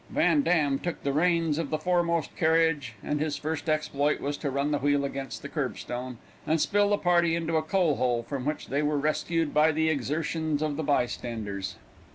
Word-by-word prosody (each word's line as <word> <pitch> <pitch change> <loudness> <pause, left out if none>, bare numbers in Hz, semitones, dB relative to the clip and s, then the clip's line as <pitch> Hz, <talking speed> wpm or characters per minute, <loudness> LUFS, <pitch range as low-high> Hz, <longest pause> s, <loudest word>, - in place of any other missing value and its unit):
Van 295 - +3
Dam 150 - +2
took 175 -1 -4
the 140 - 0
reins 165 -1 +2
of 160 -4 -2
the 155 - 0
foremost 170 -1 0
carriage, 160 -6 +2
and 150 - -1
his 150 -1 -1
first 155 0 -3
exploit 150 -1 +1
was 145 +1 -2
to 145 - -3
run 140 +2 -1
the 145 - +1
wheel 145 0 +2
against 135 -1 -5
the - - -4
curb - - -3
stone, 125 0 -5 0.3
and 160 +1 +2
spill 205 +5 +2
the 205 - +3
party 175 -2 +3
into 165 -1 -1
a 160 - +3
coal 160 -1 +1
hole, 120 -2 +1
from 130 +2 -4
which 150 +3 -3
they 140 +3 0
were 150 0 +1
rescued 155 +2 0
by 155 +1 +5
the 160 +1 +1
exertions 155 +1 -1
of 150 -2 -1
the 160 - -2
bystanders. 115 -8 -2
150 Hz, 205 wpm, -27 LUFS, 140-165 Hz, 0.3 s, by